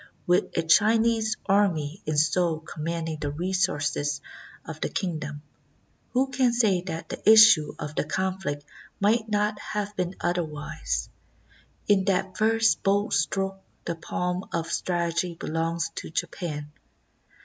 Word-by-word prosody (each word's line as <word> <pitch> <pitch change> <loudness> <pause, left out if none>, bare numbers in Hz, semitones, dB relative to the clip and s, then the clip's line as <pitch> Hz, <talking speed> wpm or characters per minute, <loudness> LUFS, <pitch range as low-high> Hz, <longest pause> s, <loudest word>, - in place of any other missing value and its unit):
With 180 +1 +1
a 165 - +2
Chinese 220 +5 +3
army 190 -5 +1
in 155 -1 0
Seoul 160 +1 +2
commanding 160 0 -4
the 145 - -1
resources 145 -4 -1 0.5
of - - -8
the - - -1
kingdom, 155 -5 -4 0.7
who 265 +2 +1
can 255 -2 +2
say 210 -7 +3
that 165 -2 -5
the - - -6
issue 215 -9 +7
of 150 - -6
the - - 0
conflict 185 -3 -2 0.3
might 220 +2 +2
not 210 0 0
have 210 -1 -4
been 180 -1 -2
otherwise? 150 - -2 0.8
In 200 -2 +4
that 190 -1 0
first 225 +1 +3
bold 205 +2 +1
stroke 195 0 0 0.2
the 170 - -1
palm 180 +2 -3
of 165 -1 -2
strategy 170 -1 -1
belongs 165 +1 -2
to - - -5
Japan. 150 -2 -4
180 Hz, 130 wpm, -26 LUFS, 155-205 Hz, 0.8 s, issue